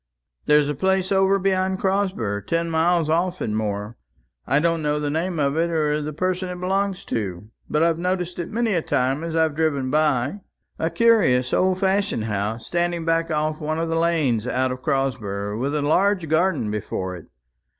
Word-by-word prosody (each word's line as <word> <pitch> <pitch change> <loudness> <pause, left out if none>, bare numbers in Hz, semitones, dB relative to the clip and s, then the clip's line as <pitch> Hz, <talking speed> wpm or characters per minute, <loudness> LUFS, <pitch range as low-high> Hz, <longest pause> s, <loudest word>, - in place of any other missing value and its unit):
There's 150 -1 +5
a 150 - -1
place 190 +5 0
over 195 0 +4
beyond 190 0 0
Crosber, 190 - 0
ten 165 +3 0
miles 165 0 +2
off 175 +3 0
and 105 - -2
more; 105 +1 -3 0.5
I 135 - +3
don't 165 +1 +1
know 150 0 0
the 145 -1 -2
name 170 +3 -1
of 140 0 +1
it, 170 +1 +1
or 150 -2 0
the 150 +1 -4
person 185 +3 -2
it 180 0 -6
belongs 195 +1 -1
to; 105 -1 -4 0.2
but 150 +1 +2
I've 165 -1 +2
noticed 180 0 -2
it 175 - -4
many 230 -1 0
a 170 - +1
time 135 +2 0
as 165 -1 -4
I've 160 -2 +2
driven 145 -5 0
by; 150 +3 +1 0.4
a 160 - 0
curious 190 - +3
old 185 +1 +2
fashioned 195 - +1
house, 110 +1 -3
standing 175 -1 -1
back 165 0 +1
off 155 0 -1
one 155 +1 -2
of 165 0 -1
the 165 - 0
lanes 150 -9 +1
out 130 +1 0
of 130 0 -6
Crosber, 110 -8 -2
with 135 +6 -2
a 150 - 0
large 180 +3 +2
garden 160 - +1
before 95 -3 -3
it. 85 - -12
160 Hz, 190 wpm, -23 LUFS, 130-180 Hz, 0.5 s, There's